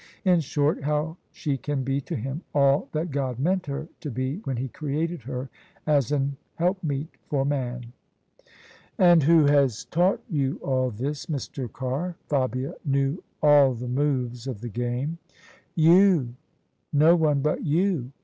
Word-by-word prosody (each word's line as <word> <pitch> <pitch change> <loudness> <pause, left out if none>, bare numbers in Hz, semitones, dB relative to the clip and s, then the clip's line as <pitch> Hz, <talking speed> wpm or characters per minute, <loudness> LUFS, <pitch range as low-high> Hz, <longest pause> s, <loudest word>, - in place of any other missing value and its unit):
In 180 -2 +5
short, 145 0 0
how 150 +3 -1
she 145 -4 -2
can 140 +1 -2
be 135 +2 -1
to - - -5
him 135 +7 -4
all 140 0 +3
that 160 +2 -2
God 130 -3 -2
meant 180 +6 0
her 145 +3 -4
to 150 - -5
be 130 +4 -2
when 130 -2 -2
He 130 +3 -2
created 155 +4 -3
her 130 +2 -5 0.4
as 145 -4 +2
an 140 -1 0 0.2
helpmeet 165 -5 -1 0.2
for 135 -2 0
man." 125 -4 -3 1.0
"And 175 -5 +6
who 160 +1 +5
has 140 -5 +3
taught 180 +4 +1
you 140 -4 0
all 130 -1 +1
this, 135 - -4
Mr. 135 - -4
Carr?" 140 +8 -3
Fabia 130 -2 0
knew 140 +3 0 0.2
all 145 -3 +6
the 125 +2 -6
moves 125 -2 -1
of 120 -6 -5
the 120 - -5
game. 125 +8 -3 0.3
" - - -29 0.2
You; 175 -10 +5 0.6
no 155 +4 +6
one 150 -4 +2
but 150 +2 0
you 160 -4 +1
140 Hz, 155 wpm, -25 LUFS, 130-155 Hz, 1.0 s, And